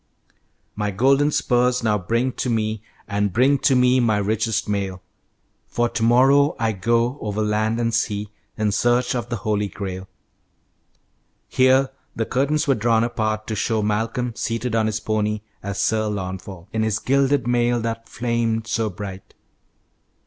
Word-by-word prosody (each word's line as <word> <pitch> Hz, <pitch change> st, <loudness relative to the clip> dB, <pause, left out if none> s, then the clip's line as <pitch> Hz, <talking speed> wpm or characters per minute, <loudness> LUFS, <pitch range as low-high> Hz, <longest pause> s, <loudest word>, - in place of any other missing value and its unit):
"My 105 Hz, -1 st, -1 dB
golden 135 Hz, +8 st, +3 dB
spurs 125 Hz, -4 st, +1 dB
now 105 Hz, -2 st, +2 dB
bring 115 Hz, +7 st, 0 dB
to 125 Hz, -, -3 dB
me, 110 Hz, -2 st, -1 dB, 0.3 s
And 100 Hz, -1 st, 0 dB
bring 135 Hz, +7 st, +3 dB
to 135 Hz, -, +3 dB
me 125 Hz, 0 st, +4 dB
my 110 Hz, -4 st, +2 dB
richest 110 Hz, +1 st, 0 dB
mail, 95 Hz, -3 st, -3 dB, 0.6 s
For 120 Hz, 0 st, 0 dB
to 110 Hz, -, -4 dB
morrow 135 Hz, +5 st, +4 dB
I 115 Hz, -2 st, 0 dB
go 115 Hz, +6 st, 0 dB
over 105 Hz, 0 st, -2 dB
land 110 Hz, +2 st, 0 dB
and 115 Hz, -1 st, 0 dB
sea 105 Hz, -2 st, -1 dB, 0.3 s
In 110 Hz, -1 st, +1 dB
search 120 Hz, +4 st, +2 dB
of 120 Hz, -1 st, -3 dB
the 120 Hz, -, -2 dB
Holy 105 Hz, 0 st, -1 dB
Grail." 95 Hz, -1 st, -6 dB, 1.4 s
Here 130 Hz, +1 st, +3 dB, 0.2 s
the 115 Hz, -, -1 dB
curtains 140 Hz, +6 st, 0 dB
were 140 Hz, -, +4 dB
drawn 115 Hz, -1 st, +2 dB
apart 110 Hz, -2 st, -2 dB
to 110 Hz, -, -3 dB
show 110 Hz, +1 st, 0 dB
Malcolm 115 Hz, +3 st, -1 dB
seated 115 Hz, +1 st, -2 dB
on 110 Hz, -1 st, +2 dB
his 110 Hz, 0 st, -1 dB
pony 105 Hz, 0 st, -1 dB, 0.2 s
as 100 Hz, 0 st, -4 dB
Sir 110 Hz, -1 st, +1 dB
Launfal, 95 Hz, -2 st, -5 dB
"in 110 Hz, -, 0 dB
his 110 Hz, -1 st, +1 dB
gilded 135 Hz, +1 st, +1 dB
mail 120 Hz, 0 st, +2 dB
that 115 Hz, 0 st, -4 dB
flamed 115 Hz, -1 st, -1 dB
so 110 Hz, 0 st, -1 dB
bright." 95 Hz, 0 st, -8 dB
115 Hz, 155 wpm, -22 LUFS, 105-120 Hz, 1.4 s, me